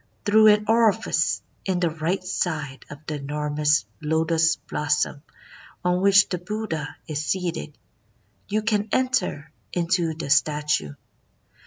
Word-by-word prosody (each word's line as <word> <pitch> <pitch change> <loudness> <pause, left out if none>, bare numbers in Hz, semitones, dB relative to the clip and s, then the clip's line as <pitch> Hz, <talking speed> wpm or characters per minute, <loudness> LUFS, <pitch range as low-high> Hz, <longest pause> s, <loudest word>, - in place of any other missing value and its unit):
"Through 215 +1 +6
an 210 0 +5
orifice 225 -2 +2 0.2
in 185 -2 -1
the 175 -2 +1
right 165 +4 -2
side 155 -7 -3
of 145 +1 -11
the 155 -1 -3
enormous 150 -1 0 0.2
lotus 160 +1 +2
blossom 150 -1 -1 0.6
on 180 0 +2
which 200 0 +6
the 180 - -2
Buddha 180 -6 -4
is 150 -2 -3
seated, 175 - -3 0.7
you 215 +2 -1
can 215 -1 0
enter 255 - 0 0.2
into 170 -2 0
the 150 -3 -5
statue. 150 - +1
165 Hz, 125 wpm, -24 LUFS, 150-195 Hz, 0.7 s, Through